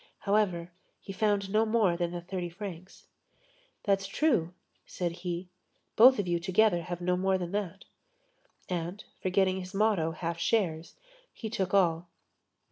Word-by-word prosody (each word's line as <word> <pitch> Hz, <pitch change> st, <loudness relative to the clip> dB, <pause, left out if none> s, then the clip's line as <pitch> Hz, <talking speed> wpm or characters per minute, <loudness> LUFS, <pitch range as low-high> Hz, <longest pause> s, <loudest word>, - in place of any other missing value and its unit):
However, 195 Hz, -5 st, +1 dB, 0.3 s
he 195 Hz, -, -8 dB
found 200 Hz, -1 st, 0 dB
no 215 Hz, +2 st, +4 dB
more 215 Hz, -5 st, +2 dB
than 175 Hz, 0 st, -1 dB
the 175 Hz, 0 st, -5 dB
thirty 180 Hz, 0 st, -4 dB
francs. 185 Hz, -1 st, -9 dB, 0.8 s
"That's 195 Hz, -1 st, +1 dB
true," 195 Hz, -, +1 dB, 0.3 s
said 175 Hz, -2 st, -3 dB
he, 175 Hz, +1 st, -5 dB, 0.5 s
"both 255 Hz, +3 st, +8 dB
of 200 Hz, -, -1 dB
you 175 Hz, -1 st, +1 dB
together 185 Hz, +1 st, +3 dB
have 175 Hz, +1 st, -6 dB
no 180 Hz, +1 st, +1 dB
more 190 Hz, +1 st, +1 dB
than 175 Hz, -2 st, -5 dB
that." 200 Hz, -2 st, -4 dB, 0.8 s
And, 180 Hz, +3 st, -4 dB, 0.2 s
forgetting 190 Hz, 0 st, +2 dB
his 185 Hz, +1 st, -8 dB
motto: 200 Hz, -6 st, +2 dB
"half 170 Hz, +1 st, -4 dB
shares," 170 Hz, -6 st, 0 dB, 0.4 s
he 220 Hz, -2 st, -7 dB
took 190 Hz, -4 st, -1 dB
all. 170 Hz, -3 st, +2 dB
185 Hz, 145 wpm, -29 LUFS, 175-205 Hz, 0.8 s, both